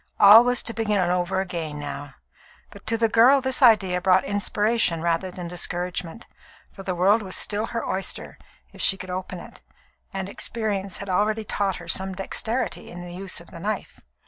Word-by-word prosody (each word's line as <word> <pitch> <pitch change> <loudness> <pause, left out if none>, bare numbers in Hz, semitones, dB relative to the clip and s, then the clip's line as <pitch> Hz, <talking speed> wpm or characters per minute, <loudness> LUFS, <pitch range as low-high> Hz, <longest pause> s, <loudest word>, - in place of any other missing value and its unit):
All 210 +3 +9
was 245 0 +1
to 230 - -3
begin 215 -2 0
over 180 +1 0
again 165 -5 -5
now; 145 -1 -7 0.6
but - - -15
to 230 +1 +1
the 225 0 +2
girl 240 +5 +5
this 260 +1 -1
idea 195 -7 +4
brought 185 0 +4
inspiration 205 -2 +1
rather 170 +2 0
than 180 -1 -7
discouragement, 175 +3 -2 0.5
for 195 - -11
the 190 -2 -3
world 195 +5 +3
was 190 -2 -4
still 210 +2 +1
her 230 - -4
oyster, 190 0 -4 0.3
if - - -9
she 195 - +3
could 185 -1 -7
open 185 0 -5
it, - - -13 0.5
and 190 -1 -4
experience 200 -2 -3
had 200 - -7
already 215 +4 +1
taught 200 -2 -1
her 170 - -10
some 190 +2 +1
dexterity 225 +6 -3
in 175 - -9
the 175 - -9
use 190 +1 -4
of - - -15
the - - -10
knife. - - -4
195 Hz, 185 wpm, -24 LUFS, 180-220 Hz, 0.6 s, All